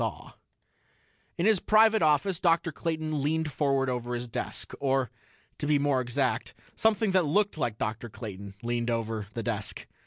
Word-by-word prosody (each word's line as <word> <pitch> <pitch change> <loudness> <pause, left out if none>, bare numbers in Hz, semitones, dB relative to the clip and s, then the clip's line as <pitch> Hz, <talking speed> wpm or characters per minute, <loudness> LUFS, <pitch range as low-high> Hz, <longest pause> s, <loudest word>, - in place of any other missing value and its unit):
In 170 - 0
his 215 -3 +5
private 220 +2 +5
office, 160 +4 +2
Dr. 165 -2 +2
Clayton 155 -2 -2
leaned 155 +2 0
forward 135 -1 +1
over 125 -1 -2
his 120 0 -4
desk. 115 - -4
Or, 135 -3 +1 0.5
to 145 - -2
be 150 -1 +4
more 140 -2 +2
exact, 125 +1 -1 0.2
something 220 -2 +2
that 185 -2 +3
looked 205 +7 +2
like 120 -8 -2
Dr. 115 +2 -3
Clayton 100 -3 -8
leaned 120 0 -1
over 110 -3 -2
the 115 - -2
desk. 110 -4 -3
140 Hz, 155 wpm, -28 LUFS, 120-165 Hz, 0.5 s, his